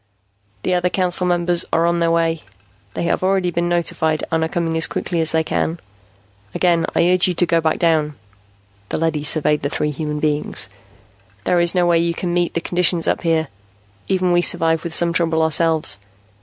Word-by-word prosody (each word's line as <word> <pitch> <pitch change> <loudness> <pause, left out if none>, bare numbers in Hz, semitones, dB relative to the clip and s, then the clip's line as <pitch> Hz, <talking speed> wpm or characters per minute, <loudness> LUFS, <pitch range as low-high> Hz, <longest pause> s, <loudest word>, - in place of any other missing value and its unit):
"The 185 - 0
other 180 0 +1
Council 180 -1 0
Members 175 -1 +1
are 165 0 +2
on 170 0 +1
their 170 0 +1
way. 165 -1 0 0.5
They - - -2
have 170 - 0
already 185 -1 +1
been 170 +1 -1
notified 160 -2 -1
and 160 0 +1
are 160 - -2
coming 165 -1 -2
as 160 - +3
quickly 170 -2 -2
as 160 - +1
they 160 0 +1
can. 165 +1 -2 0.8
Again 170 -2 +2
I 170 - +3
urge 185 0 +3
you 180 - -1
to 175 - +2
go 165 -1 +1
back 160 -1 0
down." 155 -3 +1 0.7
The - - -2
leady 160 -2 -1
surveyed 150 0 +2
the 140 - -2
three 150 +1 -2
human 150 +1 -4
beings. 150 0 0 0.8
"There 175 - +1
is 170 +1 +2
no 180 -1 +3
way 170 -1 +3
you 170 0 -1
can 175 0 -3
meet 175 -1 -1
the 170 - -1
conditions 175 -1 +1
up - - 0
here. 160 -2 0 0.6
Even 185 -1 +1
we 175 0 +3
survive 165 -2 +2
with 170 -2 -2
some 170 -1 +3
trouble, 165 -2 +1
ourselves. 160 -8 +1
170 Hz, 195 wpm, -19 LUFS, 160-175 Hz, 0.8 s, as